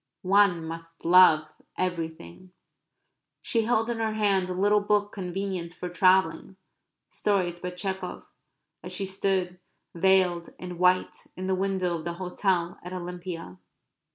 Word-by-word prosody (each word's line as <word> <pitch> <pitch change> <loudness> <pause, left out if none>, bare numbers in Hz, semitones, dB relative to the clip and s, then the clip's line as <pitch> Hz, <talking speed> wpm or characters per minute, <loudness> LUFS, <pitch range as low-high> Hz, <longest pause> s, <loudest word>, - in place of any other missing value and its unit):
"One 185 -3 +3
must 165 0 -9
love 170 -3 +7 0.3
everything." 170 - -4 0.9
She 225 -2 0
held 225 -1 +1
in 235 -1 -2
her 220 -1 0
hand 200 -4 +1
a - - -2
little 205 +3 +3
book 205 0 +1
convenient 185 -2 -4
for 180 - -6
travelling 185 0 +2 0.6
stories 180 -4 0
by 180 - -4
Tchekov 190 0 -5 0.6
as - - -8
she 195 - -2
stood, 190 -2 -1 0.3
veiled, 180 -1 +2
in 180 -1 -8
white, 180 0 +2
in 185 - -4
the 190 - 0
window 190 -2 0
of 160 - -10
the 170 - -2
hotel 180 -1 -1
at 180 +1 -8
Olympia. 175 - -7
185 Hz, 135 wpm, -27 LUFS, 175-195 Hz, 0.9 s, love